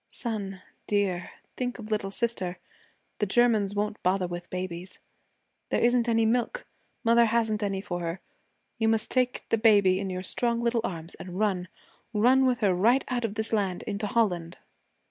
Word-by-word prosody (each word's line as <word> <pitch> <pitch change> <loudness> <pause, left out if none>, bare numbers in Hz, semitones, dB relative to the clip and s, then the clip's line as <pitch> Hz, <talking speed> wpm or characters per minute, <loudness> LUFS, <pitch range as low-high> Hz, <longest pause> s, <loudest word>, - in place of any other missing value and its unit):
'Son, 205 -5 -4 0.3
dear, 195 -4 0 0.3
think 245 -1 -3
of 220 -2 -9
little 210 -2 0
sister. 195 -4 -2 0.6
The 210 - +1
Germans 215 -2 +3
won't 210 +1 -2
bother 185 0 +1
with 175 0 -6
babies. 180 0 -5 0.7
There - - +1
isn't 240 0 +3
any 225 -1 +3
milk. 245 - 0 0.4
Mother 235 0 +5
hasn't 225 -1 +1
any 195 -2 -1
for 175 -3 -4
her. 170 +1 -3 0.6
You 225 - +2
must 225 0 +2
take 255 -1 0
baby 200 -4 +5
in 195 -1 -3
your 185 0 -4
strong 235 +4 0
little 235 0 +1
arms 165 -5 -4
and 180 0 -7
run 190 -4 0 0.5
run 255 +5 +5
with 250 -1 0
her 200 -3 +3
right 230 +9 +3
out 245 -2 0
of 215 -2 -4
this 220 0 -1
land 195 -4 0
into 210 0 -3
Holland.' 180 -7 0
210 Hz, 165 wpm, -27 LUFS, 185-235 Hz, 0.7 s, Mother